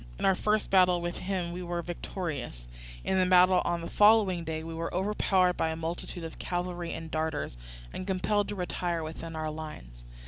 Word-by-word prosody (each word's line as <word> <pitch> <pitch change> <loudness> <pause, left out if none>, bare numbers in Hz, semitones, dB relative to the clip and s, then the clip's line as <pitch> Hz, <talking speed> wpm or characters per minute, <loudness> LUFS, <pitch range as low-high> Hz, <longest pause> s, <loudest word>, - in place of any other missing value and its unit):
In - - -2
our 190 - +6
first 210 +3 0
battle 180 -2 +5
with 175 0 -3
him 180 -2 -2
we 180 +1 -5
were 175 -1 -3
victorious; 160 - -5 0.4
in 190 - +1
the 185 - +4
battle 180 0 +6
on 175 0 0
the 165 - -5
following 205 -5 +5
day 160 0 -3
we 165 0 -6
were 165 +1 -3
overpowered 190 -1 +2
by 160 - +1
a 160 - -2
multitude 165 +1 -4
of 165 - -7
cavalry 175 -1 -3
and 160 0 -6
darters, 155 - -2 0.4
and 185 - -5
compelled 200 +2 +1
to 205 - -4
retire 175 -2 -2
within 160 +1 -6
our 155 -1 -2
lines. 150 - -8
175 Hz, 195 wpm, -29 LUFS, 160-185 Hz, 0.4 s, our